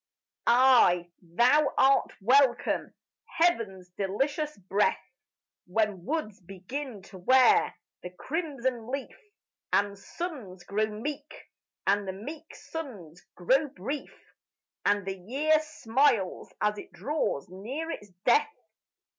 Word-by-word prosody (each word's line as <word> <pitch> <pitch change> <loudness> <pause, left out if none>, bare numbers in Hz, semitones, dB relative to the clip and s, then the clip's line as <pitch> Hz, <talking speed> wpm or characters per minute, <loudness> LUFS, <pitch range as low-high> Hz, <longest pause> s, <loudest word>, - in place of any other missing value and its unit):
Ay, 235 -9 +5
thou 240 - +3
art 270 +1 +4
welcome, 255 +4 +3 0.5
heaven's 220 - +1
delicious 275 - -2
breath, 195 +2 +1 0.7
When 195 -2 0
woods 220 -9 -3
begin 195 +5 -7
to 190 -1 -12
wear 260 - +5 0.3
the 180 - -6
crimson 260 - -3
leaf, 275 +1 -4 0.6
And 200 0 +2
suns 230 - -7
grow 215 +3 0
meek, 225 +8 -7 0.4
and 200 0 +2
the 190 - -3
meek 295 +11 -9
suns 200 - -8
grow 260 - +2
brief, 275 +5 -7 0.5
And 205 -1 +2
the 195 -1 -4
year 290 +11 +2
smiles 255 -8 +1
as 210 0 0
it - - -11
draws 290 - -2
near 255 - -5
its 205 -8 -7 0.2
death. 255 - +4
230 Hz, 110 wpm, -28 LUFS, 195-285 Hz, 0.7 s, Ay